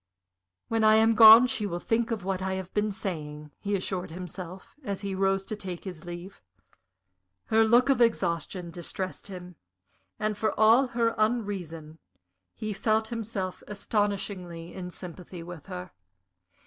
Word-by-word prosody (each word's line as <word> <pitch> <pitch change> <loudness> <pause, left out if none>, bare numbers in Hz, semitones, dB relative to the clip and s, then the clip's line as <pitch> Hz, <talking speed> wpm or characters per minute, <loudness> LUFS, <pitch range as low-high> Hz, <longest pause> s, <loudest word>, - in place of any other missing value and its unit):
"When 225 -1 0
I 215 0 +7
am 225 +1 +5
gone 225 +2 +10
she 245 -5 -1
will 175 -3 -3
think 225 +5 0
of 225 -5 -3
what 190 -1 -1
I 190 0 -1
have 190 -1 -6
been 210 0 +1
saying," 150 -6 -5
he 205 0 -1
assured 185 -1 -3
himself, 180 +2 -8
and 200 -5 -3
he 200 -1 -4
rose 195 0 +1
to 215 - -4
take 185 -4 -7
his 180 -5 -8
leave. 175 +3 -8 1.0
Her 220 0 +4
look 240 +4 +5
of 270 -3 +3
exhaustion 175 -5 0
distressed 185 +3 -5
him, 180 -3 -9 0.6
and, 215 -1 -2
for 220 - -1
all 230 +5 +6
her 230 -1 +3
unreason, 185 -9 -2 0.6
he 215 -1 -4
felt 220 +2 +1
himself 210 -5 -4
astonishingly 195 -5 -2
in 180 -1 -6
sympathy 180 0 -9
with 170 -3 -10
her. 90 0 -7
195 Hz, 150 wpm, -28 LUFS, 180-220 Hz, 1.0 s, gone